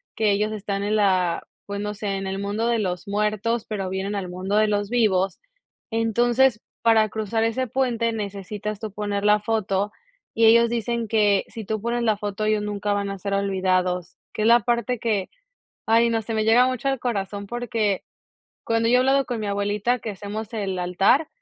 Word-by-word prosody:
que 215 -2 +2
ellos 210 +2 +1
están 200 -1 -3
en 210 +1 0
la 185 -4 +1 0.2
pues 200 0 -4
no 210 0 -3
sé, 205 0 -4
en 195 0 -4
el 190 0 -3
mundo 205 +3 -1
de 235 -1 +2
los 185 -3 -3
muertos, 210 +2 0
pero 195 -3 -3
vienen 190 +2 -3
al 190 -3 -3
mundo 190 +3 -2
de 215 0 +4
los 205 0 0
vivos. 195 -6 +2 0.5
Entonces, 235 +1 +2 0.2
para 220 -2 +4
cruzar 220 +1 -1
ese 230 +3 0
puente, 235 -2 0
necesitas 205 0 -5
tú 220 -2 -5
poner 205 -1 -2
la 210 0 +5
foto 205 -2 -1 0.4
y 225 0 +4
ellos 235 +1 +6
dicen 235 -1 -2
que 205 -2 +3
si 220 -3 -8
tú 215 0 -2
pones 235 +1 -1
la 220 -2 +3
foto, 205 +1 -3
ellos 215 -1 +2
nunca 205 0 -2
van 200 -1 -1
a 195 - -4
ser 200 +2 -4
olvidados, 185 -2 0 0.2
que 215 - -2
es - - +3
la 235 0 +6
parte 240 +2 0
que, 210 -5 -1 0.6
ay 230 +1 +4
no, 225 -1 +1
se 225 +1 -5
me 215 - +1
llega 240 +3 +6
mucho 255 +1 -2
al 270 -2 -1
corazón 200 -4 -3
porque 225 -4 -1 0.6
cuando 230 0 +1
yo 250 - +5
he - - +6
hablado 270 +1 +3
con 240 -3 -3
mi 210 - -3
abuelita 205 +4 0
que 220 - -5
hacemos 210 +3 -6
el 195 -4 -2
altar, 195 - +2
210 Hz, 200 wpm, -24 LUFS, 200-230 Hz, 0.6 s, ellos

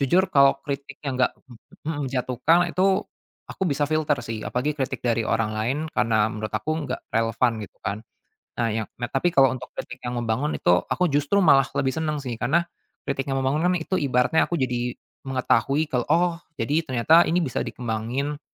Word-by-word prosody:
Jujur 175 +8 +3
kalau 140 -1 +6
kritik 140 -1 -5
yang 135 -3 -2
nggak 130 - +2
me 120 -4 -15 0.5
menjatuhkan 135 +7 +2
itu 190 +1 +2 0.5
aku 190 - -3
bisa 145 0 +1
filter 155 -1 +1
sih 115 -1 -5
apalagi 140 +5 -1
kritik 135 -3 -3
dari 115 -2 +1
orang 110 -1 0
lain 120 +6 0
karena 110 -1 +2
menurut 110 -1 -5
aku 155 +8 -2
nggak - - -3
relevan 115 +2 +2
gitu 105 - -10
kan. 100 +2 -2 0.6
Nah, 120 - 0
yang 110 0 -2
nah 120 - -5
tapi 135 +6 +1
kalau 135 -1 +6
untuk 125 0 -6
kritik 125 - -7
yang 120 - -3
membangun 120 +5 -1
itu - - +2 0.2
aku 180 -4 +1
justru 145 +8 +2
malah 135 -5 +6
lebih 130 -2 +1
senang 155 -3 -2
sih 120 -3 -5
karena 155 +8 +2 0.4
kritik 135 -1 -3
yang 135 -1 0
membangun 150 +6 +1
kan 180 - +3
itu 180 +2 -1
ibaratnya 130 +2 +2
aku 175 - -1
jadi 125 -4 -1 0.3
mengetahui 135 +3 +1
kalau, 125 -2 0
"Oh 170 +3 +3 0.2
jadi 145 +6 0
ternyata 145 +7 +5
ini 175 +2 +2
bisa 130 -6 -2
dikembangin 125 +5 -3
135 Hz, 185 wpm, -24 LUFS, 120-155 Hz, 0.6 s, kalau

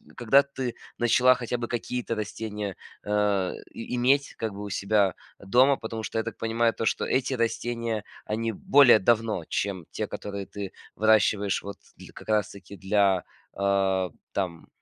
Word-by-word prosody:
когда 130 +4 +5
ты 130 -3 -5 0.2
начала 125 +2 +5
хотя 125 0 -3
бы 120 0 -4
какие-то 120 0 -3
растения, 105 -2 -5 0.3
э, 105 -2 +1 0.2
и 115 - -5
иметь 135 +3 +2
как 110 -2 -3
бы 100 +1 -7
у 105 - -6
себя 100 0 +2 0.3
дома, 125 +8 +4
потому 110 -2 -6
что 110 - -4
я 110 - +1
так 115 - -6
понимаю 115 0 +1
то, 115 - -3
что - - 0
эти 130 +1 0
растения 115 -2 -1 0.2
они 115 +1 -2
более 130 +1 +6
давно, 110 -3 +1
чем 95 -4 -2
те, - - -3
которые 100 -1 -6
ты 100 0 -7 0.2
выращиваешь 105 -2 +3
вот 100 0 -6 0.2
дл - - -12
как - - -12
раз 105 -1 +2
таки 100 0 -12
для, 95 -2 +2 0.3
а, 95 -1 +1 0.2
там 90 -4 -3
110 Hz, 160 wpm, -26 LUFS, 100-120 Hz, 0.3 s, более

